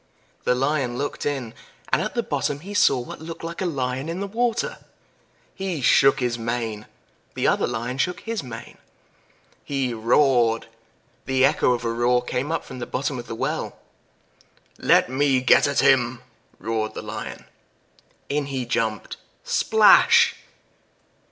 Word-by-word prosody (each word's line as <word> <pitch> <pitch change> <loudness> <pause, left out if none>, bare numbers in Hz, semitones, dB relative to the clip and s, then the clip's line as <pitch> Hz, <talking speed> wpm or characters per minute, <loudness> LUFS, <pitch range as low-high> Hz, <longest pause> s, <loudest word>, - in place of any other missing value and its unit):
The 125 - +3
Lion 135 -2 0
looked 145 +1 -3
in, 130 -6 -3 0.4
and - - +4
at - - -4
the - - 0
bottom 145 0 -2
he 200 +4 -8
saw 170 -9 +4
what 120 - -8
looked 165 +1 -8
like 170 +2 -6
a 185 - 0
Lion 130 -1 -3
in 170 +2 -4
the 200 - -2
water. 230 +3 -1 0.7
He 190 -5 -4
shook 135 +2 +4
his 120 -1 -1
mane 115 -2 -3 0.5
the - - -1
other - - +2
Lion 125 +3 -4
shook 180 +3 -1
his 225 -2 -3
mane. 115 -3 -10 0.8
He 135 -3 -2
roared 115 0 +2 0.6
the 130 0 +3
echo 140 -3 +3
of 120 -1 -4
a 115 - 0
roar 120 +1 +2
came 125 +4 -3
up 165 - -2
from 130 - -9
the 120 - -5
bottom 130 0 -2
of 120 - -9
the 115 - -5
well. - - -3 1.0
"Let - - +4
me 135 +1 +2
get 125 +2 +5
at 140 - +1
him!" 125 -2 +3 0.3
roared 110 -1 -3
the - - -6
Lion. - - -7 0.8
In 145 0 -1
he 135 -3 -3
jumped 110 -2 -2 0.3
splash! - - +5
130 Hz, 155 wpm, -23 LUFS, 120-145 Hz, 1.0 s, get